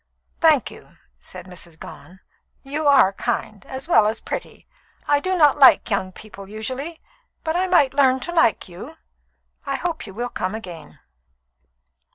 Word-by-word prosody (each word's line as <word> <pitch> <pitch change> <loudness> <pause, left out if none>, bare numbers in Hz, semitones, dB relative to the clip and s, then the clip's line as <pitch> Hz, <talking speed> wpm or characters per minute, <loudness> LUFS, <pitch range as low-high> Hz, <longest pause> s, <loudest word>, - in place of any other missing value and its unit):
"Thank 315 -6 +3
you," - - -16 0.2
said 180 -1 -11
Mrs. 175 -3 -10
Gone. 185 +3 -13 0.4
"You 290 +2 -3
are 260 -9 +5
kind, 200 0 -3
as 265 +3 -7
well 215 -11 +5
as 215 - -2
pretty. - - -7 0.4
I 290 0 +3
do 370 +4 -1
not 295 -4 +4
like 265 -3 +6
young 190 -2 -1
people 200 -1 -12
usually, 260 +10 -6 0.4
but 320 +1 -2
I 370 +1 +1
might 295 -8 +3
learn 265 -2 +3
to 345 - -4
like 325 -10 +2
you. 215 - -11 0.7
I 275 -1 -3
hope 330 -3 -4
you 195 - -10
will 240 +2 -3
come 185 -1 -3
again." 180 -7 -10
260 Hz, 160 wpm, -22 LUFS, 195-300 Hz, 0.7 s, like